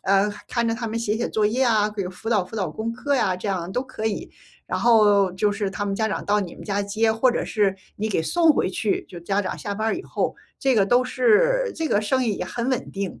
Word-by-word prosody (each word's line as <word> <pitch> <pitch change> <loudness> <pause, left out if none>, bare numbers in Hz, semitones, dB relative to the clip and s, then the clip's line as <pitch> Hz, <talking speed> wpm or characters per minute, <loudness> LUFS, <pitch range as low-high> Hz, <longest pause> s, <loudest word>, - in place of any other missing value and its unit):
呃， 195 +2 +3 0.2
看 235 -1 0
着 - - +1
他 235 -1 -4
们 225 +1 -3
写 220 -2 0
写 235 - -1
作 215 - 0
业 240 +6 +2
啊， 215 -3 +3
给 205 -2 -3
辅 190 +5 -6
导 210 -5 +2
辅 185 - -12
导 200 -4 -1
功 225 +1 -4
课 280 +4 -1
呀， 190 -7 +1
这 185 +3 -5
样 180 -3 -2
都 250 - 0
可 255 -4 -5
以。 215 - -3 0.4
然 - - -2
后 205 -5 +4
就 205 +3 +1
是 205 0 -2
他 205 - -3
们 200 - -2
家 220 +2 0
长 215 - -3
到 205 +1 +2
你 190 -4 -4
们 - - -11
家 200 -1 -1
接， 220 +2 +1
或 245 +3 +3
者 - - -1
是 205 -3 +1 0.2
你 215 +2 -2
给 190 -6 0
送 330 - +4
回 235 - 0
去， 205 +2 -1
就 175 - -9
家 195 +4 -1
长 185 - -4
下 205 -2 -4
班 215 +2 -1
儿 - - 0
以 350 - -6
后。 - - -2 0.2
这 270 -1 +3
个 195 -2 +4
都 245 +4 +3
是 460 - +3
这 325 - -1
个 205 - +2
生 255 +5 +1
意 220 -4 0
也 - - -3
很 235 +6 -3
稳 255 - -2
定。 195 -2 -4
215 Hz, 290 characters per minute, -23 LUFS, 200-235 Hz, 0.4 s, 后